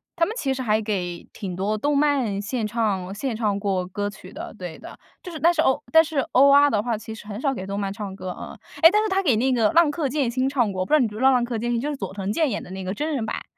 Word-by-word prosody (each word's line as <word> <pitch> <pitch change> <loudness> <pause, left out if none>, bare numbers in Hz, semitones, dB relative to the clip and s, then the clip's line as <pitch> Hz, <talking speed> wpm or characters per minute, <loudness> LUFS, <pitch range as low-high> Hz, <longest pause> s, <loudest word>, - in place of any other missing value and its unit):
他 335 - +3
们 430 - -4
其 275 - -1
实 260 - -4
还 220 -2 +1
给 180 -5 -3
挺 185 -4 -6
多 200 +4 -1
动 290 +6 0
漫 275 -9 +1
献 220 +2 -2
唱 205 -4 -1
献 230 +3 -3
唱 210 -3 0
过 190 -3 -1
歌 205 +2 -3
曲 195 -1 -13
的。 - - -7
对 175 -3 -7
的， - - -11 0.2
就 360 - -8
是 315 - -7
但 340 +2 +4
是 315 - +2
欧 285 -1 +2
但 320 0 +7
是 315 -2 -6
欧 275 +2 +6
阿 285 +1 +7
的 210 -6 +1
话 235 -1 -2
其 220 +1 -8
实 210 -1 -11
很 210 0 -6
少 270 +1 0
给 190 -6 -6
动 200 +1 -3
漫 195 -1 -2
唱 200 -2 -6
歌， 185 -2 -6
嗯， - - -8 0.2
哎， 330 - +10
但 425 +1 +3
是 - - 0
他 385 0 +1
给 270 - +2
那 255 +4 +1
个 225 -3 +3
浪 335 -2 +5
客 295 -3 -2
剑 275 -3 0
心 260 +2 0
唱 240 -7 +1
过 185 -1 -3
我 - - 0
不 - - -15
知 - - +9
道 - - +5
你 240 - +3
知 210 - -10
不 - - -6
知 260 - -2
道 270 - +7
浪 250 -2 +3
客 235 -2 -3
剑 240 +1 -2
心， 235 - +1
就 290 - -2
是 290 - -3
佐 195 -8 -5
藤 195 0 -3
健 310 +3 +1
演 210 - -3
的 180 - -11
那 190 0 -6
个 185 +1 -3
真 305 +5 -2
人 255 -6 -1
版。 220 - -4
230 Hz, 350 characters per minute, -23 LUFS, 200-280 Hz, 0.2 s, 哎